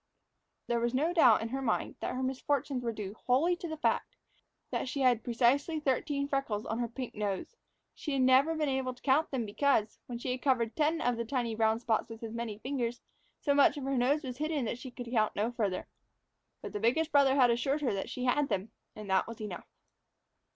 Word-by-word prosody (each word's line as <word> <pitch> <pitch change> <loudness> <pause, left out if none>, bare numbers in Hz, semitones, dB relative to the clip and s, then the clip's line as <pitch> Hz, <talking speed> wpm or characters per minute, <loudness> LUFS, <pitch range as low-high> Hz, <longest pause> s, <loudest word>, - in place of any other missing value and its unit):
There 235 0 0
was 235 +2 0
no 315 +6 +1
doubt 245 -11 +6
in 225 - -4
her 270 +3 -3
mind 245 -4 -1
that - - -3
her 260 - -2
misfortunes 265 0 -1
were 235 - 0
due 210 -3 -6
wholly 295 +8 +3
to 345 - -6
the 315 -1 -5
fact - - 0 0.6
that - - -2
she 275 - -3
had 245 -3 +3
precisely 260 +7 +2
thirteen 280 0 0
freckles 275 -7 -1
on 225 - -3
her 240 - 0
pink 250 +1 -6
nose. 205 - -3 0.4
She 295 - -4
had 265 -1 +2
never 265 +5 +5
been 310 -1 0
able 265 -2 -1
to - - -21
count 285 +4 +3
them 255 -4 -2
because, 220 0 +1
when 240 - -5
she 250 +2 -3
had 255 0 -3
covered 240 -5 +1
ten 320 +1 +1
of 245 -5 +1
the 235 - -1
tiny 235 -1 -1
brown 220 0 +2
spots 230 -2 0
with 225 0 -9
as 225 -1 -5
many 230 -3 -4
fingers, 245 -1 -3 0.4
so 285 - +2
much 285 +1 +5
of 285 - -5
her 270 +1 -1
nose 275 +5 +2
was 250 -2 -5
hidden 305 -4 -1
that 235 +2 -3
she 260 - -7
could 245 -1 -8
count 215 -3 +1
no 215 +4 0
further. 205 -6 -2 0.8
But - - -6
the 205 - -2
biggest 300 +9 +1
brother 280 -2 +5
had 250 -3 +5
assured 270 +5 0
her 260 -7 +1
that 195 - -3
she 255 - -4
had 280 +3 +2
them, 195 +3 -2 0.2
and 215 -1 -8
that 190 - +3
was 230 0 -8
enough. 210 -5 -6
250 Hz, 225 wpm, -31 LUFS, 230-280 Hz, 0.8 s, doubt